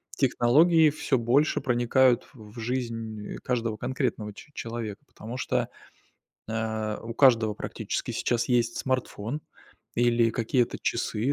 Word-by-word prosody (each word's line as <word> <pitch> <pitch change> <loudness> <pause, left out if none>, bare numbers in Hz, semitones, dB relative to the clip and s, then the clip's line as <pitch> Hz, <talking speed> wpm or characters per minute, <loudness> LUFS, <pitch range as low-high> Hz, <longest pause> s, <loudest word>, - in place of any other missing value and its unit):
технологии 150 +6 +4
всё 140 -2 0
больше 125 +6 +2
проникают 120 +1 +3
в 110 -1 -12
жизнь 115 -3 -4
каждого 115 -3 -1
конкретного 125 -4 -2
че 150 +9 -14
человека. 115 -2 -5
Потому 115 +3 -8
что, - - -1 0.8
э, 110 -1 -2
у 115 0 -6
каждого 115 -5 +5
практически - - -4
сейчас 120 -1 0
есть 120 -2 +2
смартфон 130 0 -2 0.5
или 120 -1 +3
какие-то 120 +2 0
часы, 115 +7 0
120 Hz, 115 wpm, -27 LUFS, 110-130 Hz, 0.8 s, каждого